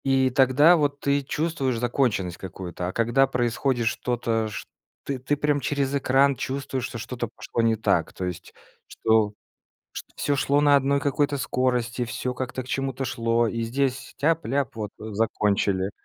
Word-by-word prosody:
И 135 Hz, -1 st, +3 dB
тогда 135 Hz, +6 st, +5 dB
вот 145 Hz, -2 st, 0 dB
ты 140 Hz, 0 st, +1 dB
чувствуешь 140 Hz, -3 st, -1 dB
законченность 120 Hz, -7 st, 0 dB
какую-то, 90 Hz, -1 st, -6 dB
а -, -, -2 dB
когда 120 Hz, +4 st, +3 dB
происходит 120 Hz, 0 st, 0 dB
что-то, 115 Hz, -2 st, -1 dB
шт 105 Hz, -, -6 dB, 0.4 s
ты 135 Hz, +1 st, -1 dB
прям 145 Hz, 0 st, +1 dB
через 140 Hz, -1 st, -1 dB
экран 135 Hz, 0 st, +3 dB
чувствуешь, 130 Hz, -1 st, -3 dB
что 120 Hz, -, -6 dB
что-то 120 Hz, +1 st, -4 dB
пошло 115 Hz, +1 st, -4 dB
не 115 Hz, -, +3 dB
так, 110 Hz, -, 0 dB
то 95 Hz, -, -4 dB
есть 90 Hz, -2 st, -6 dB, 0.3 s
что 110 Hz, -2 st, +2 dB, 0.6 s
шт -, -, -6 dB
всё 145 Hz, -, 0 dB
шло 140 Hz, +1 st, +2 dB
на 145 Hz, -1 st, +5 dB
одной 140 Hz, +1 st, +2 dB
какой-то 145 Hz, 0 st, 0 dB
скорости, 125 Hz, -2 st, 0 dB
всё 125 Hz, +1 st, -3 dB
как-то 130 Hz, 0 st, -4 dB
к 125 Hz, -, -14 dB
чему-то 135 Hz, -1 st, -2 dB
шло, 115 Hz, -1 st, +1 dB
и 115 Hz, +1 st, -3 dB
здесь 130 Hz, +3 st, -2 dB
тяп-ляп, 140 Hz, -4 st, 0 dB
вот 105 Hz, -2 st, -4 dB
закончили. 100 Hz, -3 st, 0 dB
130 Hz, 155 wpm, -25 LUFS, 115-140 Hz, 0.6 s, тогда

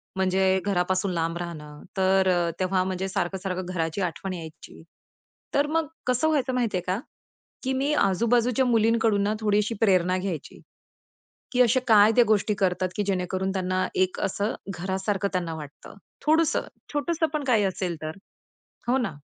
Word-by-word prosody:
म्हणजे 190 Hz, 0 st, +2 dB
घरापासून 185 Hz, 0 st, +1 dB
लांब 165 Hz, 0 st, -1 dB
राहणं. 150 Hz, -4 st, -7 dB, 0.2 s
तर 190 Hz, 0 st, +3 dB
अ, 175 Hz, -2 st, +2 dB
तेव्हा 185 Hz, 0 st, +1 dB
म्हणजे 185 Hz, 0 st, -2 dB
सारखं-सारखं 185 Hz, -1 st, -2 dB
घराची 165 Hz, +2 st, -2 dB
आठवण 185 Hz, +1 st, -3 dB
यायची. 160 Hz, -3 st, -10 dB, 0.7 s
तर 285 Hz, +1 st, +2 dB
मग 320 Hz, 0 st, 0 dB, 0.2 s
कसं 250 Hz, +5 st, +2 dB
व्हायचं 280 Hz, -5 st, +1 dB
माहिती 235 Hz, -6 st, 0 dB
आहे -, -, -2 dB
का? 185 Hz, +3 st, 0 dB, 0.6 s
की 265 Hz, 0 st, 0 dB
मी 275 Hz, +3 st, 0 dB
आजूबाजूच्या 235 Hz, +3 st, +2 dB
मुलींकडून 225 Hz, -3 st, +3 dB
ना 205 Hz, +1 st, +1 dB
थोडीशी 210 Hz, +1 st, +1 dB
प्रेरणा 185 Hz, -3 st, +3 dB
घ्यायची 180 Hz, -6 st, -5 dB, 0.9 s
की 250 Hz, -, +3 dB
असे 250 Hz, +1 st, +4 dB
काय 215 Hz, -1 st, +7 dB
त्या 245 Hz, -, +7 dB
गोष्टी 210 Hz, 0 st, +2 dB
करतात 185 Hz, -1 st, +1 dB
की 205 Hz, -, 0 dB
जेणेकरून 190 Hz, 0 st, -1 dB
त्यांना 185 Hz, -1 st, 0 dB
एक 185 Hz, 0 st, +1 dB
असं 200 Hz, +2 st, -1 dB, 0.2 s
घरासारखं 190 Hz, +2 st, -1 dB
त्यांना 175 Hz, -3 st, -1 dB
वाटतं. 150 Hz, -2 st, -10 dB, 0.3 s
थोडंसं, 315 Hz, +1 st, +2 dB, 0.3 s
छोटंसं 320 Hz, +2 st, 0 dB
पण 305 Hz, -1 st, -1 dB
काही 230 Hz, -5 st, +3 dB
असेल 185 Hz, -2 st, -1 dB
तर. 155 Hz, +3 st, -5 dB, 0.7 s
हो 250 Hz, +2 st, +3 dB
ना? 225 Hz, -10 st, -2 dB
195 Hz, 155 wpm, -26 LUFS, 185-230 Hz, 0.9 s, काय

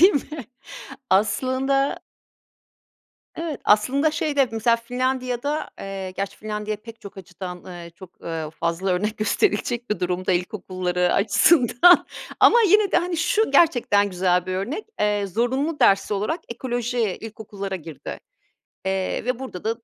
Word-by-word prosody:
değil 375 Hz, +4 st, +8 dB
mi? 285 Hz, -1 st, -4 dB, 0.7 s
Aslında 260 Hz, +7 st, +1 dB, 1.4 s
Evet, 325 Hz, -4 st, -4 dB
aslında, 265 Hz, +9 st, +3 dB
şeyde, 290 Hz, -4 st, +1 dB
mesela 230 Hz, +1 st, +2 dB
Finlandiya'da, 255 Hz, +4 st, -2 dB
eee, 195 Hz, -1 st, -5 dB
gerçi 195 Hz, +1 st, -5 dB
Finlandiya 210 Hz, 0 st, -4 dB
pek 230 Hz, +2 st, -13 dB
çok 200 Hz, 0 st, -11 dB
açıdan, 180 Hz, -1 st, -8 dB
eee, 175 Hz, -2 st, -9 dB
çok, 185 Hz, 0 st, -13 dB
eee, 160 Hz, -2 st, -4 dB
fazla 170 Hz, +3 st, -1 dB
örnek 210 Hz, +4 st, -1 dB
gösterilecek 240 Hz, -, 0 dB
bir 210 Hz, -, -1 dB
durumda 180 Hz, +1 st, -1 dB
ilkokulları 180 Hz, -1 st, -1 dB
açısından 245 Hz, -, +5 dB, 0.3 s
ama 475 Hz, -, +7 dB
yine 415 Hz, 0 st, +4 dB
de, -, -, +4 dB
hani, 355 Hz, -1 st, 0 dB
şu 430 Hz, +6 st, +1 dB
gerçekten 220 Hz, -10 st, +3 dB
güzel 180 Hz, 0 st, +1 dB
bir 185 Hz, -, -2 dB
örnek, 240 Hz, -, -3 dB, 0.2 s
eee, 210 Hz, -1 st, +1 dB
zorunlu 260 Hz, -, -1 dB
ders 195 Hz, +1 st, +4 dB
olarak 210 Hz, -, -1 dB
ekoloji 245 Hz, 0 st, -3 dB, 0.2 s
ilkokullara 205 Hz, -3 st, -6 dB
girdi, 160 Hz, -3 st, -9 dB, 0.7 s
eee, 190 Hz, +2 st, -1 dB
ve 250 Hz, -1 st, -1 dB
burada 255 Hz, -9 st, -8 dB
da, 220 Hz, -, +1 dB
215 Hz, 135 wpm, -23 LUFS, 190-265 Hz, 1.4 s, değil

